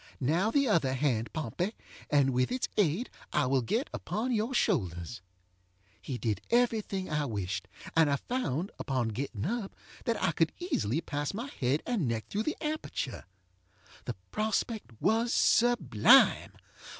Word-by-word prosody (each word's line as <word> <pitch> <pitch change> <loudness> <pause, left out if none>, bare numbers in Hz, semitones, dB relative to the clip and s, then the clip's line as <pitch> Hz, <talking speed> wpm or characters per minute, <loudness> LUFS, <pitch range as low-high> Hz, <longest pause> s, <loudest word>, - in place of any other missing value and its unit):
Now, 165 - +2
the 280 +3 +2
other 150 - +2
hand, 125 -5 0
Pompey, 160 - -3 0.3
and 140 -2 +4
with 125 0 +1
its 255 0 -1
aid 200 - +1 0.2
I 150 - +2
will 130 0 +2
get 225 - -1
upon 235 +4 -2
your 225 +1 0
shoulders. 115 - 0
ŌĆØ 90 0 -39
He 130 - -4
did 105 -5 -1
every 235 -2 +3
thing 190 -2 -4
I 150 -1 0
wished, 100 -4 -3 0.3
and 160 -2 +5
I 140 - +3
found, 180 - -2
upon 130 -4 -1
getting 115 -1 -4
up, 215 +1 -3 0.3
that 230 - 0
I 190 - +2
could 165 0 +1
easily 160 - -1
pass 145 +4 -3
my 245 +6 -5
head 130 +4 +1
and 220 - 0
neck 115 -1 -2
through 205 - -1
the - - -4
aperture. 305 - -3 0.8
The - - -3 0.2
prospect 220 - -1
was 230 +2 +2
sublime. 180 - +5
150 Hz, 155 wpm, -30 LUFS, -, 0.8 s, and